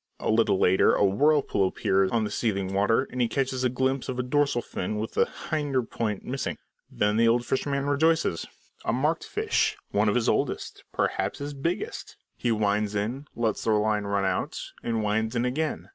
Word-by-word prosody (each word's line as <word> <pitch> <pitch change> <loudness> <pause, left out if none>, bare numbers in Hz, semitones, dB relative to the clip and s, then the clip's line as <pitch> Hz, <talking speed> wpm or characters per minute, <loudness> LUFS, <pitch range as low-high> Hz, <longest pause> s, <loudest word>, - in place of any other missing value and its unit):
A - - 0
little 110 -3 +3
later 95 0 +4
a 105 - +3
whirlpool 130 -1 +3
appears 95 +1 +1
on 115 +1 +1
the 105 - -3
seething 100 -4 -1
water, 110 +6 +2
and 125 - -2
he 120 - +3
catches 130 +2 -1
a 125 - +3
glimpse 130 +1 -1
of 130 - -3
a 125 - 0
dorsal 140 -2 +1
fin 105 +4 -4
with 110 +1 -3
the - - +2 0.2
hinder 145 -5 +1
point 110 -3 -3
missing. 135 +1 -3 0.3
Then 105 +1 +1
the 115 0 +4
old 120 +1 +3
fisherman 140 +1 -1
rejoices. 150 - +1 0.4
A - - 0
marked 150 +7 0
fish, 435 +1 0
one - - +2
of - - +1
his - - +1
oldest, - - -1
perhaps - - -1
his 145 0 -5
biggest! 165 +6 -4 0.2
He 120 - -1
winds 105 -1 +1
in, 120 +8 -2
lets 115 -2 -1
the 110 - +2
line 105 -1 +1
run 100 -1 0
out, 95 -1 -1 0.2
and 115 -2 -1
winds 110 +3 0
in 120 +1 +1
again. 150 +5 -2
115 Hz, 190 wpm, -27 LUFS, 105-135 Hz, 0.4 s, later